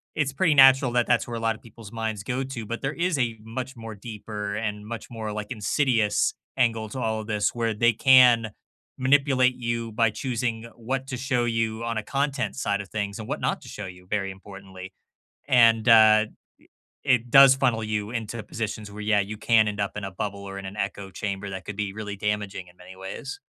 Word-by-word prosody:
it's 145 Hz, -3 st, 0 dB
pretty 155 Hz, +1 st, +2 dB
natural 135 Hz, -1 st, +7 dB
that 120 Hz, -1 st, +3 dB
that's 120 Hz, -1 st, +1 dB
where 120 Hz, -, -5 dB
a -, -, -4 dB
lot 115 Hz, -1 st, 0 dB
of -, -, -17 dB
people's 115 Hz, -3 st, -13 dB
minds 110 Hz, -3 st, -3 dB
go 130 Hz, +4 st, -2 dB
to. 125 Hz, -4 st, -6 dB
But 115 Hz, +3 st, -5 dB
there 140 Hz, +2 st, -2 dB
is 170 Hz, -1 st, 0 dB
a 115 Hz, -3 st, 0 dB
much 125 Hz, +4 st, -6 dB
more 115 Hz, -2 st, -8 dB
deeper 105 Hz, -1 st, -6 dB
and 105 Hz, -1 st, -3 dB
much 115 Hz, -1 st, -7 dB
more, 110 Hz, -2 st, -5 dB
like, 105 Hz, +1 st, -6 dB
insidious 115 Hz, -1 st, +1 dB, 0.2 s
angle 115 Hz, -4 st, +1 dB
to 130 Hz, -, -6 dB
all 110 Hz, -2 st, -1 dB
of 105 Hz, -, -10 dB
this. 105 Hz, -2 st, 0 dB
Where 115 Hz, -1 st, 0 dB
they 115 Hz, +2 st, +3 dB
can 125 Hz, -4 st, +6 dB, 0.5 s
manipulate 130 Hz, -1 st, +3 dB
you 115 Hz, -1 st, -3 dB
by 115 Hz, +1 st, +2 dB
choosing 120 Hz, 0 st, -3 dB
what 130 Hz, +3 st, -3 dB
to 130 Hz, -, -4 dB
show 125 Hz, -1 st, 0 dB
you 115 Hz, -1 st, -1 dB
on 115 Hz, -1 st, -2 dB
a -, -, -6 dB
content 140 Hz, +1 st, -1 dB
side 100 Hz, -6 st, -1 dB
of 100 Hz, -, -11 dB
things, 100 Hz, -1 st, -3 dB
and 110 Hz, -, -7 dB
what -, -, -3 dB
not -, -, -1 dB
to -, -, -13 dB
show 105 Hz, -, -7 dB
you, 90 Hz, -1 st, -11 dB
very 100 Hz, -2 st, -1 dB
importantly. 95 Hz, -1 st, -11 dB, 0.6 s
And, 115 Hz, -3 st, +5 dB
uh, 110 Hz, -1 st, +7 dB, 0.8 s
i -, -, 0 dB
it 120 Hz, 0 st, -3 dB
does 135 Hz, 0 st, +9 dB
funnel 125 Hz, -4 st, +1 dB
you 105 Hz, -1 st, -2 dB
into 115 Hz, -1 st, -4 dB
positions 105 Hz, 0 st, -5 dB
where, 105 Hz, +1 st, -9 dB
yeah, 105 Hz, -1 st, +2 dB
you 100 Hz, +2 st, -4 dB
can 110 Hz, 0 st, +3 dB
end 105 Hz, -, -4 dB
up 100 Hz, 0 st, -2 dB
in 105 Hz, -, -4 dB
a 95 Hz, -, -4 dB
bubble 100 Hz, +2 st, -4 dB
or 100 Hz, 0 st, -7 dB
in 100 Hz, -, -8 dB
an 95 Hz, +2 st, -7 dB
echo 100 Hz, -1 st, -4 dB
chamber 100 Hz, +1 st, -4 dB
that 95 Hz, -1 st, -6 dB
could 105 Hz, -, -7 dB
be 105 Hz, -1 st, -2 dB
really 105 Hz, -1 st, -6 dB
damaging 105 Hz, -2 st, -3 dB
in 90 Hz, 0 st, -19 dB
many 90 Hz, +1 st, -13 dB
ways. 95 Hz, -, -7 dB
110 Hz, 220 wpm, -25 LUFS, 105-125 Hz, 0.8 s, does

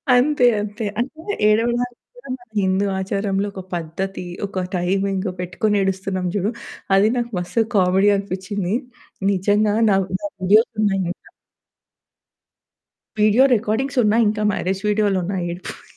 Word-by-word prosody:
అంతే, 255 Hz, +1 st, +3 dB, 0.2 s
అంతే. 210 Hz, +2 st, -4 dB
అంటే 315 Hz, +11 st, -3 dB
ఏడవడానికి 240 Hz, +3 st, +1 dB, 0.2 s
కూడా -, -, -14 dB
మన 245 Hz, -, -21 dB
హిందూ 190 Hz, +1 st, +1 dB
ఆచారంలో 195 Hz, +1 st, -1 dB
ఒక 190 Hz, -, -6 dB
పద్ధతి, 180 Hz, +3 st, -4 dB, 0.2 s
ఒక 190 Hz, -2 st, -3 dB
టైమింగ్ 195 Hz, +2 st, 0 dB
పెట్టుకొని 180 Hz, +4 st, -1 dB
ఏడుస్తున్నాం 190 Hz, -1 st, -1 dB
జూడు, 205 Hz, +3 st, 0 dB, 0.4 s
అది 200 Hz, +3 st, +5 dB
నాకు 240 Hz, -1 st, -2 dB
మస్త్ 180 Hz, +6 st, 0 dB, 0.2 s
కామెడీ 190 Hz, +2 st, +4 dB
అనిపిచ్చింది. 195 Hz, +1 st, -3 dB, 0.6 s
నిజంగా 205 Hz, +2 st, +2 dB
నావి 195 Hz, -1 st, +2 dB
నా 205 Hz, -, -2 dB
వీడియోస్ 210 Hz, +6 st, +4 dB
ఉన్నాయి 195 Hz, -2 st, +1 dB
ఇంకా. -, -, -12 dB, 1.9 s
వీడియో 215 Hz, +5 st, +5 dB
రికార్డింగ్స్ 240 Hz, +5 st, -1 dB
ఉన్నాయి 220 Hz, +2 st, +3 dB
ఇంకా 215 Hz, 0 st, -2 dB
మ్యారేజ్ 190 Hz, +1 st, -2 dB
వీడియోలున్నాయి 195 Hz, -3 st, 0 dB
ఏడుపుయి. 175 Hz, +2 st, -8 dB
200 Hz, 125 wpm, -21 LUFS, 190-220 Hz, 1.9 s, అది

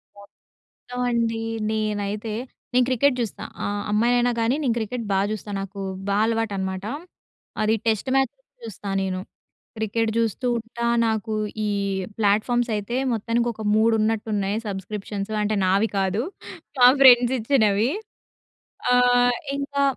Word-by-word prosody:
మొత్తం 200 Hz, 0 st, -18 dB, 0.7 s
అండి 230 Hz, -1 st, 0 dB, 0.3 s
నేనైతే 210 Hz, 0 st, -2 dB, 0.4 s
నేను 250 Hz, 0 st, +4 dB
క్రికెట్ 260 Hz, +1 st, +3 dB
జూస్తా. 230 Hz, -4 st, -4 dB, 0.2 s
ఆహ్, 205 Hz, 0 st, -2 dB
అమ్మాయినైనా 240 Hz, +3 st, +3 dB
గానీ 230 Hz, +3 st, +2 dB
నేను 250 Hz, -5 st, +1 dB
క్రికెట్ 230 Hz, +2 st, -3 dB
బా 190 Hz, -, +3 dB
జూస్తా. 215 Hz, -1 st, -5 dB
నాకు 195 Hz, +1 st, -7 dB, 0.3 s
బా 200 Hz, -, +1 dB
అలవాటనమాట. 200 Hz, -4 st, -2 dB, 0.8 s
అది 215 Hz, +1 st, +3 dB
టెస్ట్ 220 Hz, +2 st, +1 dB
మ్యాచ్ 270 Hz, -2 st, +2 dB, 0.3 s
చూస్తా 210 Hz, -2 st, -7 dB
నేను. 185 Hz, -1 st, -2 dB, 0.6 s
క్రికెట్ 220 Hz, +1 st, 0 dB
జూస్తూ 230 Hz, +2 st, 0 dB
ఉంటా, 235 Hz, +1 st, -6 dB, 0.2 s
నాకు 220 Hz, -1 st, -1 dB, 0.3 s
ఈ -, -, 0 dB, 0.5 s
ప్లాట్‍ఫామ్స్ 220 Hz, +4 st, +2 dB
అయితే 210 Hz, +4 st, -3 dB, 0.2 s
మొత్తానికి 230 Hz, +2 st, 0 dB
ఒక 220 Hz, -, -9 dB
3 225 Hz, +1 st, +4 dB
ఉన్నట్టు 220 Hz, 0 st, 0 dB
ఉన్నాయి 200 Hz, 0 st, 0 dB
సబ్స్క్రిప్షన్సు 200 Hz, +1 st, -5 dB
అంటే 210 Hz, +1 st, 0 dB
నావి 195 Hz, +4 st, +3 dB
కాదు. 195 Hz, +2 st, 0 dB, 0.6 s
మా 245 Hz, -, +8 dB
ఫ్రెండ్స్ 245 Hz, -2 st, +7 dB
ఇచ్చినవి. 220 Hz, -3 st, +2 dB, 1.0 s
ఆ! -, -, +5 dB, 0.6 s
ఇంకా 280 Hz, 0 st, -1 dB
220 Hz, 125 wpm, -24 LUFS, 205-235 Hz, 1.0 s, మా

